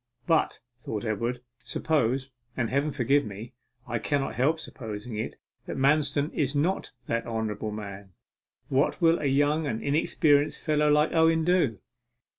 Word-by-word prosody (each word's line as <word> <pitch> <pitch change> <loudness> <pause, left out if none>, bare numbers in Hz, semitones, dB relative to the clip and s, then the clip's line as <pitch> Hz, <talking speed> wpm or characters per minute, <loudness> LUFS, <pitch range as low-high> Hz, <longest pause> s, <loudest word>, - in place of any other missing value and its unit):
'But,' 165 - +2 0.2
thought 110 -2 -4
Edward, 115 +3 -2 0.2
'suppose 135 -3 0 0.3
and 120 -3 -1
Heaven 140 +3 +1
forgive 140 +1 +2
me, 105 +4 -8 0.3
I - - -2
cannot 140 -2 -1
help 150 +6 +1
supposing 110 -4 -7
it 110 - -4 0.3
that - - -4
Manston 145 +2 +2
is 140 -1 0
not 165 +7 0 0.2
that 115 0 -2
honourable 110 -2 -2
man, 100 -2 -8 0.5
what 135 +2 +1
will 165 -1 +4
a - - -3
young 145 +3 +2
and 110 -4 -3
inexperienced 145 0 +2
fellow 150 -1 +2
like 150 +1 +4
Owen 160 0 +3
do? 170 - +2
140 Hz, 145 wpm, -27 LUFS, 115-150 Hz, 0.5 s, will